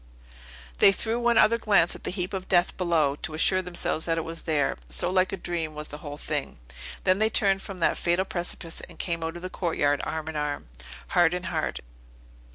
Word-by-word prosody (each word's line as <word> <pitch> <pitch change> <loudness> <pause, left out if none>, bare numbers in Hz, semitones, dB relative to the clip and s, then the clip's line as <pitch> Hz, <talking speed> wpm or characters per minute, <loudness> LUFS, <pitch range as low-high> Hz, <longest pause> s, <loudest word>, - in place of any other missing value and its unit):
They - - +8
threw 225 +4 -2
one 240 -1 +2
other 230 +2 +5
glance 200 -6 +3
at - - -10
the - - -1
heap 180 0 -3
of 190 -1 -5
death 175 -1 +3
below, 165 -6 +1
to 155 - -5
assure 185 +4 +4
themselves 175 -3 -1
that 165 -1 0
it 165 - -1
was 165 0 -5
there; 145 -3 +1
so 175 - +2
like 185 0 +2
a 195 - -3
dream 165 -3 -3
was 150 0 -5
the 150 - -7
whole 145 -1 -7
thing. - - -3 0.5
Then 185 +1 +3
they 220 0 +3
turned 195 -3 +3
from 195 -1 -8
that - - +2
fatal 175 +2 +1
precipice, 175 -2 -2
and - - -13
came 170 -2 -2
out 165 +1 -3
of 175 - -9
the 185 - -4
courtyard, 145 -5 0
arm 160 -1 -4
in 160 - -5
arm, 145 - -3 0.4
heart 175 -1 +3
in 180 - -4
heart. - - -2
175 Hz, 215 wpm, -26 LUFS, 160-190 Hz, 0.5 s, They